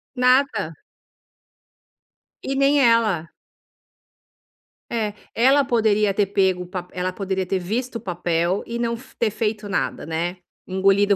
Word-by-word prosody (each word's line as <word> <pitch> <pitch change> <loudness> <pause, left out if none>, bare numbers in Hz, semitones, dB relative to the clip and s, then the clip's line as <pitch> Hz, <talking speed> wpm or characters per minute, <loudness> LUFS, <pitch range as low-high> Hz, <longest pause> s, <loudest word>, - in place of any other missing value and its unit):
Nada. 250 - +2 1.7
E 270 - -2
nem 275 +1 +4
ela. 225 - +3 1.6
É. 215 -3 -1 0.2
Ela 270 +4 +4
poderia 215 -4 +2
ter 200 -1 +1
pego 190 -2 +1
o - - -11
pape 180 -1 -6
ela 180 0 -1
poderia 190 -1 -2
ter 190 +1 0
visto 230 +7 -3
o - - -2
papel, 175 -1 -1
e 235 0 -4
não 235 -1 -1
f 255 +3 -14
ter 220 -3 +1
feito 215 -1 -2
nada, 200 - -2
né. 170 +3 -2 0.3
Engolido, 195 +2 +3
205 Hz, 135 wpm, -22 LUFS, 185-235 Hz, 1.7 s, nem